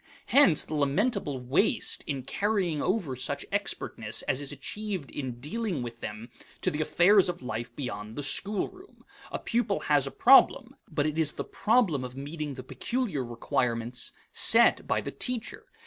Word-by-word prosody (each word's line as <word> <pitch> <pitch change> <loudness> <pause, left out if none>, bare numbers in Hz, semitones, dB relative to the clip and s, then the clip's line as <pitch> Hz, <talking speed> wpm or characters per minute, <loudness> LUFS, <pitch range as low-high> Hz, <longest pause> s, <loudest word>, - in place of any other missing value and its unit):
Hence 230 - +5
the - - -7
lamentable 150 - 0
waste 145 - +1
in 140 -3 -3
carrying 190 - 0
over 185 - -1
such 140 +3 -3
expertness 115 - -2
as 135 - -1
is 145 - -4
achieved 185 +3 -5
in 130 -4 -5
dealing 170 - -3
with 115 -1 -7
them 110 +2 -7 0.3
to - - +1
the 150 - -2
affairs 180 +5 +4
of 175 - -5
life 120 -1 -5
beyond 110 -5 -5
the 145 - -4
schoolroom. 210 - -2 0.3
A - - -2
pupil 230 -4 -1
has 145 -2 +2
a - - -5
problem, 270 -1 +5
but 150 -4 0
it 155 +1 -1
is 155 -2 +1
the - - -4
problem 205 - +1
of 125 0 -7
meeting 145 +1 -5
the 130 - -8
peculiar 200 - -2
requirements 120 0 -2 0.2
set - - +5
by - - +1
the - - -5
teacher. 250 -3 -3
145 Hz, 165 wpm, -28 LUFS, 130-200 Hz, 0.3 s, Hence